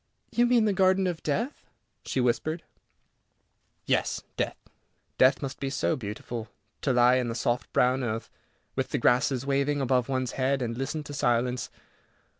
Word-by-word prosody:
"You 240 0 +3
mean 240 -2 +4
the 210 - +2
Garden 190 0 +3
of 175 -3 -2
Death," 230 - -2 0.4
she - - -1
whispered. 155 +7 0 1.2
"Yes, - - 0
death. - - -2 0.6
Death 130 +3 +5
must 135 0 -5
be 135 - -2
so 140 +4 0
beautiful. 110 -1 -6 0.3
To 135 - +1
lie 125 0 +5
in 125 -2 0
the 115 - -3
soft 120 +1 -1
brown 130 0 +2
earth, 115 -1 -3 0.4
with - - -1
the - - 0
grasses 125 +1 +2
waving 140 +1 +1
above 130 -2 +1
one's 130 -2 -1
head, 135 0 0
and 115 -1 -3
listen 135 +5 -3
to 145 - -8
silence. 125 -2 0
130 Hz, 160 wpm, -28 LUFS, 125-145 Hz, 1.2 s, Death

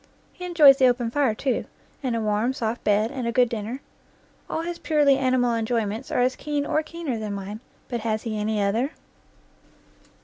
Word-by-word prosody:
He 360 - -8
enjoys 305 -6 +7
the 260 -2 +5
open 240 -2 +1
fire, 270 -5 +1
too, 260 +3 -1 0.4
and 255 -4 -1
a 230 - -1
warm, 215 +4 0
soft 230 -1 -3
bed, 210 +3 +2
and 255 -4 -3
a - - 0
good 245 0 +3
dinner. 230 +4 -4 0.7
All 320 - -2
his 345 0 -5
purely 295 -3 +3
animal 255 -2 +2
enjoy 230 0 0
ments 220 +6 -5
are - - +1
as 255 +1 +2
keen 290 -1 -2
or 310 - +1
keener 310 -6 -5
than 210 -2 -4
mine, 200 +2 -6 0.3
but 240 - -3
has 215 -1 -2
he 225 -2 -3
any 215 0 -1
other? 230 +9 0
245 Hz, 195 wpm, -24 LUFS, 220-275 Hz, 0.7 s, enjoys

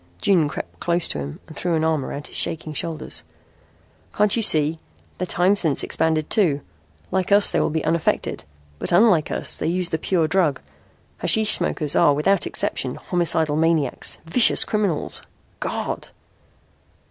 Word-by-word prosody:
June 170 - +2
crept - - -8
close 175 0 +1
to - - -3
him 70 0 -7
and 155 - -13
threw 175 +2 -2
an 160 - 0
arm 160 -3 0
around 145 +2 -7
his - - -8
shaking 155 -1 -1
shoulders. 160 +1 -4 0.9
"Can't 210 0 +3
you 230 - 0
see? 155 -4 +5 0.4
Their 185 - -2
time 180 +4 +2
sense 160 -8 0
expanded 160 -1 -1
too. 160 -10 +1 0.5
Like 190 +1 -1
us 200 0 +5
they - - 0
were - - +1
unaffected. 160 +1 -1 0.4
But - - -2
unlike 175 -4 +4
us - - 0
they - - -3
use 175 +1 -1
the 160 - -2
pure 165 -2 0
drug. 160 -5 +1 0.6
Hashish 220 -1 +2
smokers 150 -3 -1
are 145 - +4
without 195 +7 +1
exception - - -2
homicidal 160 -4 0
maniacs, 160 -4 0
vicious 200 +9 +6
criminals. 205 -8 -1 0.4
God!" - - -4
165 Hz, 155 wpm, -21 LUFS, 155-185 Hz, 0.9 s, vicious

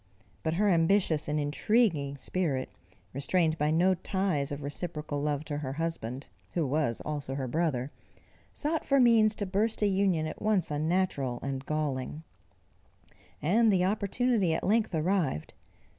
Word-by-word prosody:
But 160 0 -1
her 205 +4 +2
ambitious 170 -3 +2
and 150 +1 0
intriguing 150 - +1
spirit, 140 -3 -2 0.4
restrained 160 +3 +1
by 150 +1 +2
no 175 +4 +4
ties 180 -5 -1
of 145 0 -5
reciprocal 150 -1 -4
love 145 0 -1
to 145 -1 -3
her 135 -3 -4
husband, 140 -5 -3 0.3
who 170 -3 +1
was 140 -4 0
also 145 -3 -4
her 135 -2 -3
brother, 140 -3 0 0.6
sought 310 +1 -2
for 275 -1 +3
means 225 -3 +5
to 205 - -2
burst 210 +3 0
a - - +4
union 190 -5 +1
at 155 - -6
once 210 -7 +1
unnatural 150 -5 0
and 135 0 -4
galling: 150 -1 -2 1.2
and 215 +8 +4
the 185 -2 +3
opportunity 205 -2 +1
at - - -3
length 215 -2 +1
arrived. 160 - 0
160 Hz, 145 wpm, -29 LUFS, 145-195 Hz, 1.2 s, means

